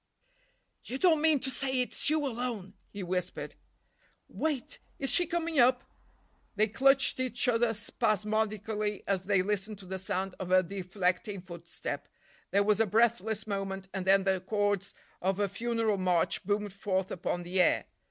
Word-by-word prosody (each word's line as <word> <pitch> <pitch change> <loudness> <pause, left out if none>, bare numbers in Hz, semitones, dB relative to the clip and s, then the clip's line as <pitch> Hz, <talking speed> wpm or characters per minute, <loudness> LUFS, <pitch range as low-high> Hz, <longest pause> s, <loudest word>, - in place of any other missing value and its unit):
"You 260 - -4
don't 320 0 +4
mean 315 -2 +4
to 265 - 0
say 260 0 -1
it's 250 - -1
you—alone!" 245 -9 -2 0.2
he 200 -1 -6
whispered. 180 0 -3 0.7
"Wait—is 275 -2 -3
she 350 - +5
coming 335 -3 -1
up?" 250 +1 +5 0.7
They 215 +1 +4
clutched 270 +4 +3
each 250 -1 0
other 240 -1 +3
spasmodically 215 0 -1
as 190 -2 -1
they 195 -2 +3
listened 210 +1 -2
to 195 - -13
the 190 +1 -4
sound 190 0 -2
of 185 - -4
a 185 0 +5
deflecting 190 +2 -2
footstep. 170 -2 -7 0.4
There 200 +1 +3
was 210 0 +2
a 225 - +3
breathless 220 0 +2
moment, 195 -2 -4
and 190 -1 -4
then 195 0 +5
the 190 -1 +1
chords 205 0 -1 0.3
of 190 +2 0
a 205 - +2
funeral 225 +1 0
march 180 -3 +1
boomed 205 0 -1
forth 190 -1 -1
upon 175 0 -2
the 180 +2 +1
air. - - +3
205 Hz, 150 wpm, -30 LUFS, 190-240 Hz, 0.7 s, she